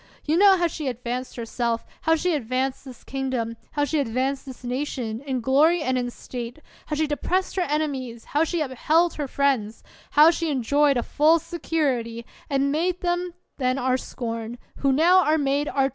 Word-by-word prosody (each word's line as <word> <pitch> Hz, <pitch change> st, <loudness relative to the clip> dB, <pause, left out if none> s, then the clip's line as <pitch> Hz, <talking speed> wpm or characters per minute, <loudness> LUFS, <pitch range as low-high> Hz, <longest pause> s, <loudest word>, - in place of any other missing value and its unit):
You 310 Hz, -, +2 dB
know 390 Hz, +1 st, +6 dB
how 345 Hz, -, +1 dB
she 315 Hz, -3 st, -3 dB
advanced 250 Hz, +1 st, -4 dB
herself, 235 Hz, 0 st, -2 dB, 0.2 s
how 320 Hz, +1 st, +3 dB
she 350 Hz, +2 st, 0 dB
advanced 260 Hz, 0 st, -2 dB
this 255 Hz, -3 st, -11 dB
kingdom, 260 Hz, -4 st, -3 dB, 0.2 s
how 290 Hz, -1 st, +1 dB
she 305 Hz, +2 st, 0 dB
advanced 265 Hz, +2 st, -1 dB
this 260 Hz, -1 st, -10 dB
nation, 245 Hz, -3 st, -3 dB
in 260 Hz, -2 st, -1 dB
glory 300 Hz, +7 st, +3 dB
and 260 Hz, -2 st, 0 dB
in 245 Hz, -1 st, -1 dB
State; 240 Hz, 0 st, -7 dB, 0.3 s
how 300 Hz, -, -2 dB
she 310 Hz, +1 st, +1 dB
depressed 360 Hz, +5 st, -1 dB
her 380 Hz, -, +1 dB
enemies, 280 Hz, -7 st, -2 dB
how 295 Hz, +2 st, +1 dB
she 330 Hz, 0 st, -1 dB
upheld 310 Hz, +5 st, +2 dB
her 295 Hz, -2 st, -4 dB
friends; 255 Hz, -6 st, 0 dB, 0.3 s
how 305 Hz, +3 st, +7 dB
she 335 Hz, -1 st, -2 dB
enjoyed 280 Hz, +1 st, +2 dB
a 240 Hz, -, 0 dB
full 310 Hz, +3 st, +4 dB
security, 285 Hz, -9 st, -2 dB, 0.2 s
and 280 Hz, 0 st, +1 dB
made 350 Hz, +4 st, 0 dB
them 350 Hz, 0 st, -1 dB, 0.2 s
then 255 Hz, 0 st, +1 dB
our 255 Hz, -1 st, +1 dB
scorn, 230 Hz, -2 st, -5 dB, 0.2 s
who 275 Hz, -, +2 dB
now 350 Hz, +7 st, +5 dB
are 310 Hz, 0 st, +3 dB
made 285 Hz, 0 st, 0 dB
our 270 Hz, -2 st, +2 dB
terror -, -, -5 dB
275 Hz, 185 wpm, -24 LUFS, 250-315 Hz, 0.3 s, how